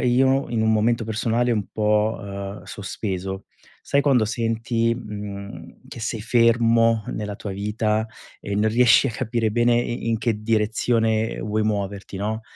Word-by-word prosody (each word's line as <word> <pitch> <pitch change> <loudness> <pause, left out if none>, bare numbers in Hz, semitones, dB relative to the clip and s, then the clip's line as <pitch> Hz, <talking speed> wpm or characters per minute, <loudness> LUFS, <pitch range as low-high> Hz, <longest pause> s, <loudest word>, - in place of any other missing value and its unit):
io 130 +2 +2
in 115 -2 0
un 110 - +3
momento 115 +1 +2
personale 115 +2 0
un 105 -4 0
po' 105 +1 +1
uhm, 100 0 -6
sospeso. 95 -2 -5 0.4
Sai 140 - +2
quando 135 -6 +3
senti, 115 +1 0
mhmm, 100 -2 -8
che - - -9
sei 115 -1 -3
fermo 115 -1 +3
nella 105 -1 -4
tua 100 - -6
vita 105 +2 -1 0.3
e 100 - -5
non 110 +1 +2
riesci 125 +3 +5
a - - -3
capire 115 -1 -1
bene 120 +2 +3
in 120 0 -3
in 110 - 0
che 110 -2 -1
direzione 110 0 +1
vuoi 110 0 -1
muoverti, 100 -2 -3
no. 110 +3 -3
110 Hz, 155 wpm, -23 LUFS, 105-115 Hz, 0.4 s, riesci